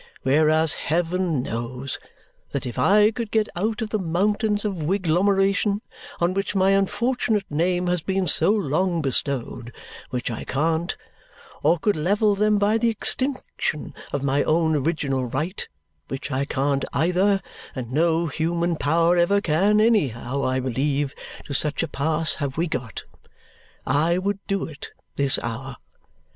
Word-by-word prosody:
Whereas, 155 Hz, +3 st, +3 dB, 0.2 s
heaven 170 Hz, -3 st, 0 dB
knows 125 Hz, +2 st, -4 dB, 0.5 s
that 140 Hz, -, -2 dB
if 120 Hz, -, -4 dB
I 210 Hz, +2 st, +5 dB
could 230 Hz, -1 st, -4 dB
get 220 Hz, 0 st, +1 dB
out 215 Hz, +5 st, -1 dB
of 215 Hz, -, -6 dB
the 215 Hz, -, 0 dB
mountains 205 Hz, +4 st, 0 dB
of 195 Hz, -5 st, -2 dB
wiglomeration 195 Hz, +4 st, +2 dB, 0.4 s
on 175 Hz, +1 st, +2 dB
which 195 Hz, +1 st, -2 dB
my 190 Hz, 0 st, +4 dB
unfortunate 215 Hz, +1 st, +1 dB
name 175 Hz, +4 st, +1 dB
has 180 Hz, -1 st, +1 dB
been 190 Hz, +2 st, 0 dB
so 165 Hz, +1 st, +3 dB
long 180 Hz, -3 st, +1 dB
bestowed 130 Hz, -3 st, -2 dB, 0.4 s
(which 125 Hz, -1 st, -3 dB
I 115 Hz, -, -5 dB
can't) 160 Hz, +4 st, -1 dB, 0.6 s
or 160 Hz, +4 st, +4 dB
could 205 Hz, +5 st, +1 dB
level 205 Hz, +7 st, +2 dB
them 210 Hz, +1 st, +2 dB
by 205 Hz, +2 st, +2 dB
the 235 Hz, 0 st, +3 dB
extinction 255 Hz, -, -3 dB, 0.2 s
of 140 Hz, -, -2 dB
my 140 Hz, +1 st, +2 dB
own 160 Hz, 0 st, +2 dB
original 140 Hz, -3 st, 0 dB
right 155 Hz, -, -3 dB, 0.4 s
(which 135 Hz, +1 st, -5 dB
I 135 Hz, +1 st, 0 dB
can't 140 Hz, 0 st, 0 dB
either, 180 Hz, +6 st, +2 dB, 0.4 s
and 125 Hz, -3 st, -5 dB
no 165 Hz, +3 st, +2 dB
human 170 Hz, +2 st, -1 dB
power 165 Hz, +4 st, +3 dB
ever 175 Hz, +4 st, +4 dB
can, 200 Hz, +4 st, +2 dB
anyhow, 140 Hz, -, +1 dB
I 130 Hz, 0 st, +1 dB
believe, 135 Hz, +2 st, -1 dB, 0.3 s
to 140 Hz, -, -5 dB
such 150 Hz, +3 st, -1 dB
a -, -, -1 dB
pass 160 Hz, +2 st, 0 dB
have 140 Hz, -2 st, -3 dB
we 170 Hz, -, +2 dB
got), 125 Hz, -, -4 dB, 0.8 s
I 155 Hz, +6 st, +2 dB
would 200 Hz, +2 st, -1 dB
do 195 Hz, -1 st, 0 dB
it 150 Hz, -3 st, -9 dB, 0.3 s
this 140 Hz, -1 st, +2 dB
hour. 125 Hz, +3 st, -5 dB
165 Hz, 150 wpm, -24 LUFS, 140-195 Hz, 0.8 s, I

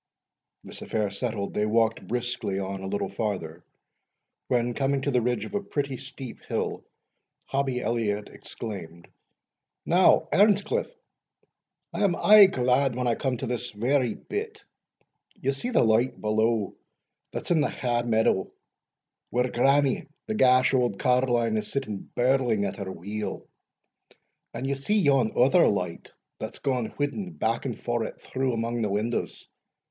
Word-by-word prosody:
This -, -, -9 dB
affair 105 Hz, -3 st, -1 dB
settled, 110 Hz, -5 st, -3 dB
they 105 Hz, 0 st, 0 dB
walked 115 Hz, +1 st, +1 dB
briskly 120 Hz, -4 st, -2 dB
on 95 Hz, 0 st, -4 dB
a 95 Hz, -, -5 dB
little 100 Hz, +1 st, -2 dB
farther, 90 Hz, -6 st, -4 dB, 0.8 s
when, 120 Hz, -1 st, +1 dB
coming 135 Hz, +1 st, 0 dB
to 140 Hz, -, 0 dB
the 125 Hz, -2 st, +2 dB
ridge 120 Hz, +1 st, -1 dB
of -, -, -10 dB
a 205 Hz, -, 0 dB
pretty 140 Hz, -8 st, -3 dB
steep 130 Hz, -1 st, -9 dB
hill, -, -, -3 dB, 0.6 s
Hobbie 135 Hz, -2 st, -1 dB
Elliot 105 Hz, -4 st, -1 dB
exclaimed, 85 Hz, -6 st, -8 dB, 0.8 s
"Now, 175 Hz, -2 st, +4 dB
Earnscliff, 205 Hz, -, +3 dB, 1.0 s
I 210 Hz, -, -1 dB
am 190 Hz, -4 st, +3 dB
aye 210 Hz, +1 st, +8 dB
glad 130 Hz, -4 st, +1 dB
when 125 Hz, 0 st, -2 dB
I 120 Hz, -, +2 dB
come 130 Hz, 0 st, -1 dB
to 130 Hz, -, -4 dB
this 125 Hz, 0 st, -3 dB
very 120 Hz, +2 st, 0 dB
bit 430 Hz, 0 st, -6 dB, 0.7 s
Ye 135 Hz, -, -1 dB
see 140 Hz, -, -3 dB
the 250 Hz, -, +3 dB
light 115 Hz, +3 st, +2 dB
below, 110 Hz, -1 st, +1 dB, 0.6 s
that's -, -, -3 dB
in 165 Hz, -3 st, +4 dB
the -, -, +1 dB
ha' 120 Hz, -2 st, -1 dB
window, 110 Hz, -4 st, +1 dB, 0.8 s
where 125 Hz, +1 st, 0 dB
grannie, 135 Hz, +2 st, +2 dB, 0.2 s
the 220 Hz, -, -3 dB
gash 130 Hz, -8 st, +4 dB
auld 125 Hz, -6 st, +1 dB
carline, 120 Hz, -3 st, +2 dB
is 105 Hz, -1 st, -4 dB
sitting 110 Hz, -8 st, -4 dB
birling 120 Hz, -4 st, +2 dB
at -, -, -4 dB
her 100 Hz, -3 st, -5 dB
wheel 105 Hz, +4 st, -5 dB, 1.1 s
and 130 Hz, -, -5 dB
ye 140 Hz, -, 0 dB
see 140 Hz, +11 st, 0 dB
yon 135 Hz, -, +3 dB
other 140 Hz, +8 st, +5 dB
light 90 Hz, -4 st, -2 dB, 0.3 s
that's -, -, -6 dB
gaun 125 Hz, -4 st, -1 dB
whiddin' 170 Hz, +6 st, -2 dB
back 115 Hz, -2 st, -1 dB
and 125 Hz, -4 st, -2 dB
forrit 120 Hz, -2 st, -3 dB
through 130 Hz, -1 st, -2 dB
amang 115 Hz, +1 st, -2 dB
the 105 Hz, -, 0 dB
windows? 110 Hz, +4 st, -2 dB
125 Hz, 150 wpm, -26 LUFS, 110-135 Hz, 1.1 s, aye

